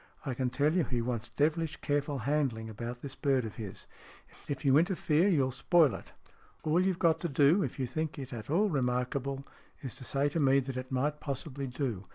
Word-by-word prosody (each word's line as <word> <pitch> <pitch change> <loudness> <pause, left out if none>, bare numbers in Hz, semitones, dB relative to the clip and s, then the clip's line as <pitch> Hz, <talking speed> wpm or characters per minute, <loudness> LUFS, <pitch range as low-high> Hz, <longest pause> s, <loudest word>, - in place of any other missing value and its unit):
I 135 - -1
can 125 +1 -1
tell 145 +4 +2
you 180 -1 +3
he 125 -3 -1
wants 120 -1 -3
devilish 160 +2 0
careful 145 -1 0
handling 130 -7 0
about 120 +3 -6
this 140 -2 -6
bird 135 -4 +1
of 110 - -7
his. 105 -5 -7 0.6
If 145 +1 -4
you 135 -1 +5
interfere, 170 -1 +2
you'll 140 -9 +3
spoil 145 +2 +4
it. - - -9 0.5
All 160 +4 +3
you've 190 -2 +1
got 165 -3 +3
to 170 - -2
do, 145 +7 +4
if - - -3
you 130 - -1
think 155 +5 -3
it 135 -2 -6
at 110 0 -7
all 190 +8 +3
remarkable, 135 -1 -1 0.4
is 130 - -4
to - - -7
say 140 +3 +1
to 165 - -2
me 135 -2 +5
that 135 0 -5
it 130 0 -5
might 145 +4 0
possibly 140 -1 -4
do. 125 -7 -3
140 Hz, 205 wpm, -31 LUFS, 125-155 Hz, 0.6 s, you